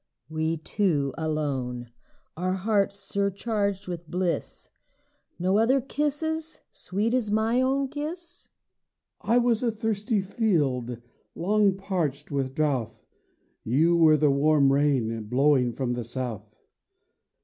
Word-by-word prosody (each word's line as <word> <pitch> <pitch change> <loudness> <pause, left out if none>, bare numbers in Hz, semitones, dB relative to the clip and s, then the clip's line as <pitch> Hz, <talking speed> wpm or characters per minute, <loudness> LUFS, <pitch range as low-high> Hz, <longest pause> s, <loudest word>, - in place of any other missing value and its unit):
We 160 +1 -1
two 155 -5 0
alone, 135 -6 -2 0.4
our 185 +3 -1
hearts 200 +1 +1
surcharged 200 0 -1
with 170 -3 -6
bliss, 180 -1 -2 0.7
Nor 190 +4 +2
other 260 +4 +4
kisses, 300 +4 -2
sweet 210 +5 -2
as 245 -4 +1
my 220 +4 +2
own 270 +1 +1
kiss? 310 +5 -5 0.7
HUSBAND - - -1
I - - +6
was 230 -2 +2
a 245 - +2
thirsty 220 -1 -1
field, 150 - 0 0.4
long 200 +2 +2
parched 165 -8 -2
with 135 -2 -2
drouth; 140 -7 -1 0.6
You 155 +9 +3
were 160 -2 +6
the 150 -1 +3
warm 140 -1 +4
rain, 130 -6 +1
blowing 130 +1 +3
from 125 0 -2
the 120 -1 -3
south. 115 -3 -5
175 Hz, 120 wpm, -26 LUFS, 140-215 Hz, 0.7 s, I